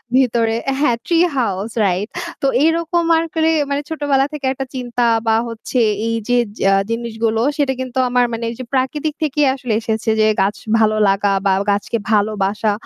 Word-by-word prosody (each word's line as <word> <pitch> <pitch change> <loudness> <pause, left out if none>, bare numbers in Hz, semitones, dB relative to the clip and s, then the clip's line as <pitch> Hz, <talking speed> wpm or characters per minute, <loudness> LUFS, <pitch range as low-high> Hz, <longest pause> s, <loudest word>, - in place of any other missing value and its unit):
ভিতরে 235 -3 +2 0.2
হ্যাঁ, 245 -5 +2
tree 340 0 +3
house 210 -2 -1
right। 190 +3 -1 0.3
তো 275 - +2 0.2
এরকম 335 +1 +1
আরকি 325 0 0 0.2
মানে 280 +1 -1
ছোটবেলা 285 -4 +1
থেকে 285 -3 -5
একটা 270 0 -5
চিন্তা 245 -1 -1 0.2
বা 220 - +4
হচ্ছে 230 +2 -3 0.3
এই 230 - 0
যে 245 - +3 0.3
আ - - +4 0.2
জিনিসগুলো 225 -1 -1 0.2
সেটা 275 -2 +1
কিন্তু 255 0 -6
আমার 245 0 +3
মানে 230 0 -4
এই 235 - -6
যে - - -4
প্রাকৃতিক 290 +4 -1
থেকেই 295 0 +1
আসলে 250 -4 -3
এসেছে। 220 0 -2
যে - - +4 0.2
গাছ 200 +2 +1 0.2
ভালো 215 -1 +3
লাগা 195 +1 +1
বা 195 - +4 0.2
গাছকে 205 +3 -1
ভালোবাসা 210 0 +1
240 Hz, 170 wpm, -18 LUFS, 220-280 Hz, 0.3 s, বা